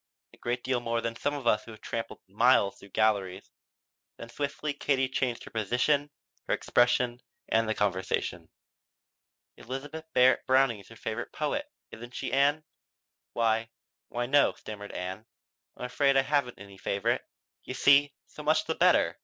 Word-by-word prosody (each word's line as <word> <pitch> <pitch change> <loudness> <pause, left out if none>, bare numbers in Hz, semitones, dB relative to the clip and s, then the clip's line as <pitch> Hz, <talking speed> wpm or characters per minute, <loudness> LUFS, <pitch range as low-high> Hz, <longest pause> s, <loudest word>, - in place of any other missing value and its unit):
A - - -17
great 120 +1 -3
deal 130 -1 0
more 115 -1 -1
than 115 0 -3
some 145 +5 -1
of 140 -4 -6
us 105 -2 +3
who've 110 -1 -11
tramped 115 0 -4 0.2
miles 105 0 +3
through 100 - -14
galleries." 100 -3 0 0.7
Then 115 - -9
swiftly 145 +3 -3
Katie 135 -2 +1
changed 130 -2 -2
her - - -11
position, 125 +7 +1 0.4
her - - +2
expression 120 0 +2 0.3
and 115 0 +2
the 110 - 0
conversation. 95 -2 -1 1.1
"Elizabeth 145 +6 -7
Barrett 130 0 +4
Browning 130 -4 +3
is 100 - -16
your 115 - -13
favorite 110 +2 -4
poet, 285 - -2 0.2
isn't 120 +2 -10
she, 135 - -4
Ann?" 145 +3 +3 0.7
"Why 115 -1 +1 0.4
why 120 0 -2
no," 145 +3 +4
stammered 105 -1 -9
Ann. 95 +5 -6 0.5
"I'm - - -5
afraid 135 +2 +2
I 135 - +5
haven't 140 -3 0
any 100 -1 -13
favorite. 115 +7 0 0.4
You 125 - -6
see 140 +1 +5
" - - -65
"So - - -8
much 155 +1 +2
the - - -1
better. - - +3
120 Hz, 160 wpm, -29 LUFS, 110-140 Hz, 1.1 s, I